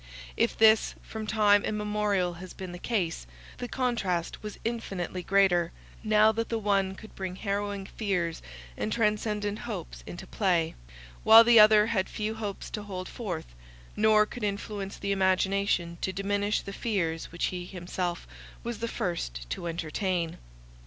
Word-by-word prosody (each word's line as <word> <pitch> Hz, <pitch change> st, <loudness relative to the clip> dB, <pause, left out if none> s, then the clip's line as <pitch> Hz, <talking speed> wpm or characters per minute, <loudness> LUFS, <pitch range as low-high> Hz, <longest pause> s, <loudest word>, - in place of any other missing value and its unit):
If -, -, +1 dB
this 220 Hz, 0 st, +5 dB
from 220 Hz, -1 st, -6 dB
time 205 Hz, -1 st, +4 dB
immemorial 210 Hz, -4 st, 0 dB
has 185 Hz, -, -9 dB
been 185 Hz, -2 st, -7 dB
the 175 Hz, -, -8 dB
case, 175 Hz, -, -2 dB, 0.3 s
the 245 Hz, -, -3 dB
contrast 225 Hz, -10 st, -1 dB
was 210 Hz, -1 st, -7 dB
infinitely 195 Hz, -6 st, -3 dB
greater, 180 Hz, -2 st, +3 dB, 0.3 s
now 215 Hz, 0 st, +5 dB
that 230 Hz, +1 st, -3 dB
the 230 Hz, -, 0 dB
one 200 Hz, -3 st, +1 dB
could 220 Hz, +2 st, -12 dB
bring 185 Hz, -1 st, -5 dB
harrowing 200 Hz, 0 st, -2 dB
fears 185 Hz, -6 st, -2 dB, 0.3 s
and 215 Hz, -, -3 dB
transcendent 210 Hz, -1 st, 0 dB
hopes -, -, -6 dB
into -, -, -7 dB
play; 170 Hz, -5 st, +1 dB, 0.5 s
while 225 Hz, +1 st, +10 dB
the 235 Hz, -1 st, +7 dB
other 210 Hz, 0 st, +8 dB
had 210 Hz, -4 st, 0 dB
few 215 Hz, +1 st, -3 dB
hopes 210 Hz, -3 st, -5 dB
to 210 Hz, -, -4 dB
hold 185 Hz, -3 st, -6 dB
forth, 175 Hz, -, -5 dB, 0.4 s
nor 215 Hz, 0 st, +5 dB
could 235 Hz, +1 st, -8 dB
influence 200 Hz, -1 st, -3 dB
the 200 Hz, -, -2 dB
imagination 190 Hz, -2 st, +1 dB
to 190 Hz, -, -1 dB
diminish 205 Hz, +2 st, 0 dB
the 200 Hz, -, -8 dB
fears 170 Hz, -8 st, -2 dB
which 170 Hz, -, -1 dB
he 180 Hz, -1 st, -4 dB
himself 175 Hz, -1 st, -4 dB, 0.4 s
was 235 Hz, -2 st, -4 dB
the 230 Hz, -, -2 dB
first 170 Hz, -, -3 dB
to 170 Hz, -, -3 dB
entertain. 170 Hz, +1 st, -2 dB
200 Hz, 150 wpm, -28 LUFS, 180-215 Hz, 0.5 s, while